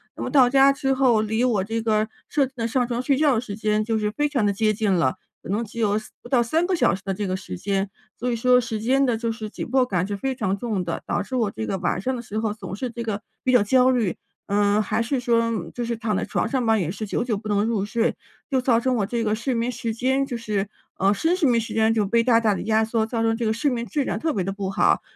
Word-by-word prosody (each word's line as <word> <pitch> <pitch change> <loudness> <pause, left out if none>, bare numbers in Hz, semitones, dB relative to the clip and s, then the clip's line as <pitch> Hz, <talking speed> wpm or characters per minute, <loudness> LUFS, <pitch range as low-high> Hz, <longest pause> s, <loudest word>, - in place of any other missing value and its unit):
那 - - -8
么 - - -3
到 265 -4 +6
家 275 +1 +6
之 270 -1 0
后 250 -5 +3
离 220 +2 -1 0.2
这 225 +1 -2
个 215 -1 +1 0.2
设 280 -3 +2
置 260 - -11
的 230 0 -1
上 245 +1 +1
床 240 0 -2
睡 275 +1 +2
觉 295 -2 +4
的 225 - +1
时 205 -5 -6
间 215 -1 0
就 225 -1 0
是 210 -1 -1
非 295 +6 0
常 255 -8 +1
的 200 - +3
接 215 +1 +1
近 210 -2 0
了， 165 -8 +2 0.3
可 - - -11
能 215 +4 0
只 230 +2 -9
有 210 -2 +2
3， 215 0 -7
不 - - -11
到 245 -3 +3
3 320 +9 +1
个 375 - +1
小 175 - +3
时 190 - -5
的 195 - -1
这 205 +2 -3
个 185 -1 -1
时 90 - -7
间， 195 - -1 0.3
所 250 +1 -1
以 - - 0
说 250 +2 +4
时 225 -2 -4
间 265 +4 +2
的 240 -3 +1
就 230 0 -2
是 220 -1 -6
紧 - - -6
迫 260 0 +3
感 180 -5 0
是 205 - -3
非 265 +4 -2
常 205 -6 -1
重 210 -4 -2
的， 170 -1 -4
导 205 - 0
致 255 - -5
我 220 -4 +1
这 110 - -5
个 190 - -2
晚 180 0 -1
上 260 +5 -1
的 - - -5
时 215 -2 -6
候 220 -2 -1
总 195 -3 -7
是 250 +5 -3
这 235 - -6
个 215 -2 -3 0.2
比 255 - +2
较 245 -5 +6
焦 255 +4 +4
虑。 235 -8 +1 0.3
嗯， 205 +1 +3
还 215 +2 -1
是 250 +3 -1
说 230 -5 0
就 245 - -2
是 235 0 -2
躺 220 -2 -1
在 - - -1
床 - - -1
上 260 -3 -1
吧， 225 0 +3
也 175 -6 -1
是 210 +4 -4
久 - - -2
久 235 -3 -1
不 215 +1 -6
能 205 +1 +2
入 225 -4 0
睡， 230 +3 0 0.3
就 265 -2 +1
造 245 -2 +3
成 255 +1 0
我 205 -4 +1
这 235 +2 -2
个 215 -1 +1
睡 255 +4 -2
眠 235 +1 0
时 230 -2 -3
间 265 +4 +1
就 250 -3 -4
是 210 -3 -2 0.3
呃， 195 +2 +4
深 325 - +1
睡 315 -8 +2
眠 235 -1 +3
时 225 - -5
间 225 0 +3
就 215 -3 +1
被 230 +3 +2
大 230 -2 +4
大 215 -3 +2
的 - - -4
压 220 0 +2
缩， 225 0 0
造 230 0 -2
成 225 0 +2
这 230 0 -2
个 220 - +2
睡 280 +6 +1
眠 235 -2 -2
质 270 +7 -1
量 - - -2
特 320 -1 -1
别 195 - -1
的 195 - -2
不 195 -1 -4
好， 195 - +2
225 Hz, 315 characters per minute, -23 LUFS, 210-250 Hz, 0.3 s, 到